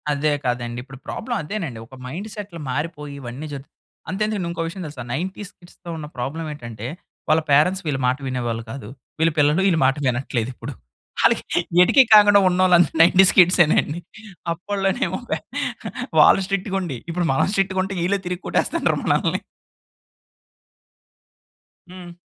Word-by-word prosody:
అదే 150 +1 +1
కదండి. 120 -1 -2
ఇప్పుడు 135 +1 -12
ప్రాబ్లమ్ 235 +1 -3
అదేనండి, 150 - -5
ఒక 130 - -13
మైండ్‌సెట్లు 200 +4 -7
మారిపోయి, 150 0 -4
ఇవన్నీ 130 +5 -7
జరుగు 140 0 -8 0.4
అంతెందుకండి 210 -2 -1
ఇంకో 170 - -4
విషయం 185 +2 -6
తెలుసా, 145 -5 -8
90స్ 185 +6 -4
కిడ్స్‌తో 175 0 -15
ఉన్న 155 - -6
ప్రాబ్లమేటంటే, 130 -5 -5 0.4
వాళ్ళ 155 +1 +4
పేరెంట్స్ 180 +7 +3
వీళ్ళ 140 -3 -1
మాట 125 +1 +1
వినేవాళ్ళు 120 -3 -3
కాదు, 135 -5 -8 0.3
వీళ్ళ 165 +1 +3
పిల్లలు 150 +5 +3
ఈళ్ళ 170 - +2
మాట 135 0 +3
వినట్లేదిప్పుడు. 125 -1 -3 0.5
అళ్ళకి - - +2 0.2
ఎటికీ 265 +9 +6
కాకుండా 205 -1 +8
ఉన్నొళ్ళందరూ 180 -2 +3
90స్ 185 +3 +6
కిడ్సేనండి. 175 -3 +4 0.5
అప్పడిలోనేమో 195 +6 -1
పే - - 0 0.8
వాళ్ళు - - +6
స్ట్రిక్టుగుండి, 195 - -2
ఇప్పుడు 175 +1 -1
మనం 135 - +2
స్ట్రిక్టుగుంటే, 190 0 0
ఈళ్ళే 200 +2 +1
తిరిగి 180 0 -4
కొట్టేస్తన్నారు - - 0
మనల్ని. - - +1 2.5
హ్మ్. 180 -1 -10
165 Hz, 125 wpm, -22 LUFS, 135-190 Hz, 2.5 s, కాకుండా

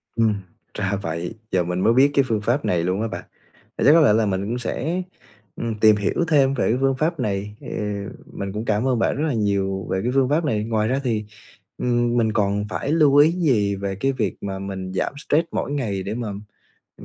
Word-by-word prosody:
Ừm, 115 -2 +3 0.4
ra 100 -1 -1
vậy, 85 +3 -4 0.2
giờ 90 -1 +2
mình 90 +1 -2
mới 115 +5 +3
biết 135 +3 +5
cái 140 -1 +4
phương 110 -3 0
pháp 120 +7 0
này 85 -2 +1
luôn 90 +4 0
á 115 - 0
bạn, - - -6 0.5
vậy - - 0
chắc 145 - +8
có 165 - +6
lẽ 140 -9 +5
là 110 0 +3
mình 95 -1 -1
cũng 120 +4 -2
sẽ, 160 +8 -2 0.5
ừm, 115 -2 -3
tìm 110 -1 +6
hiểu 105 - 0
thêm 140 -4 +4
về 140 - 0
cái 120 - +2
phương 135 0 +2
pháp 155 +4 -1
này, 105 -3 -2
thì - - -11 0.7
mình 100 -1 -5
cũng 105 +2 -4
cảm 110 +4 +1
ơn 125 -3 +1
bạn - - +1
rất 150 - 0
là 150 - 0
nhiều 100 -3 -1
về 95 - +1
cái 125 - 0
phương 135 -2 +3
pháp 155 +3 +1
này. 105 -7 0
Ngoài 110 -1 0
ra 130 +3 0
thì, 110 -4 -1 0.5
ừm, 120 -1 +1
mình 110 -2 +2
còn 105 -1 +1
phải 140 - -3
lưu 150 -3 +4
ý 145 +3 +7
gì 125 - +1
về 100 0 -3
cái 135 +8 0
việc 110 -7 -2
mà 95 -1 -4
mình 95 -1 -5
giảm 95 - -1
stress 160 +3 +2
mỗi - - -2
ngày 110 -10 -2
để 100 +3 -4
mà, 120 -1 -3 0.7
ừ, - - -13
110 Hz, 235 wpm, -22 LUFS, 100-135 Hz, 0.7 s, chắc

